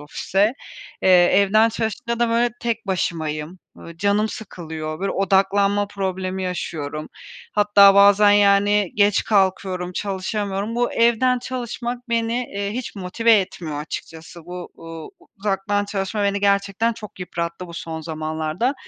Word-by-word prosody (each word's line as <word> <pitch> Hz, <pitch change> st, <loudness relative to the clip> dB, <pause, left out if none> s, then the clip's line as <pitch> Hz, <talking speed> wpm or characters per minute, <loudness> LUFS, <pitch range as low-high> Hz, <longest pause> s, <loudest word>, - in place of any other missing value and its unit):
ofise. 195 Hz, +8 st, 0 dB, 0.5 s
Eee, -, -, +3 dB, 0.2 s
evden 200 Hz, +4 st, +4 dB
çalışınca 225 Hz, +1 st, -3 dB
da, 235 Hz, -, +3 dB
böyle, 235 Hz, +1 st, +2 dB
tek 230 Hz, -2 st, -2 dB
başımayım. 160 Hz, -3 st, -3 dB, 0.2 s
Iıı, 170 Hz, 0 st, -11 dB
canım 205 Hz, +3 st, +1 dB
sıkılıyor. 160 Hz, -7 st, -7 dB
Böyle, 195 Hz, -, -1 dB
odaklanma 200 Hz, +1 st, +2 dB
problemi 190 Hz, -1 st, -3 dB
yaşıyorum. 155 Hz, -4 st, -4 dB, 0.4 s
Hatta 205 Hz, -1 st, +6 dB
bazen, 200 Hz, +1 st, +6 dB
yani, 205 Hz, -1 st, +4 dB
geç 205 Hz, -1 st, +3 dB
kalkıyorum, 190 Hz, -3 st, 0 dB
çalışamıyorum. 200 Hz, +2 st, -3 dB
Bu 245 Hz, 0 st, 0 dB
evden 235 Hz, +2 st, +3 dB
çalışmak 245 Hz, 0 st, -5 dB
beni, 230 Hz, 0 st, 0 dB, 0.2 s
eee, 200 Hz, 0 st, -2 dB
hiç 250 Hz, -1 st, -5 dB
motive 200 Hz, +5 st, +1 dB
etmiyor 160 Hz, -5 st, -5 dB
açıkçası. 160 Hz, +2 st, -8 dB
Bu, 180 Hz, 0 st, -7 dB
uuu, 165 Hz, -1 st, -9 dB, 0.3 s
uzaktan 205 Hz, 0 st, -1 dB
çalışma 200 Hz, +1 st, -3 dB
beni 200 Hz, 0 st, 0 dB
gerçekten 200 Hz, +3 st, +1 dB
çok 210 Hz, -4 st, -11 dB
yıprattı 170 Hz, 0 st, -4 dB
bu 170 Hz, -, -11 dB
son 165 Hz, -1 st, -6 dB
zamanlarda. 160 Hz, -, -2 dB
200 Hz, 130 wpm, -21 LUFS, 180-215 Hz, 0.5 s, Hatta